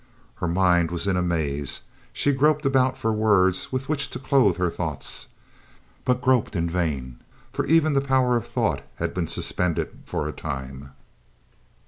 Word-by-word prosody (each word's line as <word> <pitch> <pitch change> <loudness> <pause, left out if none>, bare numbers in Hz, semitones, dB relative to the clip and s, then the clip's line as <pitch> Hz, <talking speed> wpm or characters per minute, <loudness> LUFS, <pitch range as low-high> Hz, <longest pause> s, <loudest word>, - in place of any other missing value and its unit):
Her 90 - -2
mind 85 -1 +3
was 85 +2 -2
in 100 -2 +1
a 90 - +1
maze, 75 -5 -1 0.3
she 145 - +1
groped 150 +2 +2
about 130 -1 +2
for 110 0 0
words 100 -4 +2
with 130 +1 -3
which 140 -3 0
to - - -6
clothe 130 - +3
her 90 -2 0
thoughts, 80 -6 -3 0.8
but 125 0 +1
groped 125 -5 +2
in 85 -1 0
vain, 75 -8 -2 0.3
for - - -2
even 160 -1 +4
the 135 - +3
power 130 -2 +2
of 120 - -1
thought - - 0
had - - -3
been 90 -2 -2
suspended 90 +1 0 0.2
for - - -2
a - - -3
time. 70 -2 -6
95 Hz, 165 wpm, -24 LUFS, 85-130 Hz, 0.8 s, even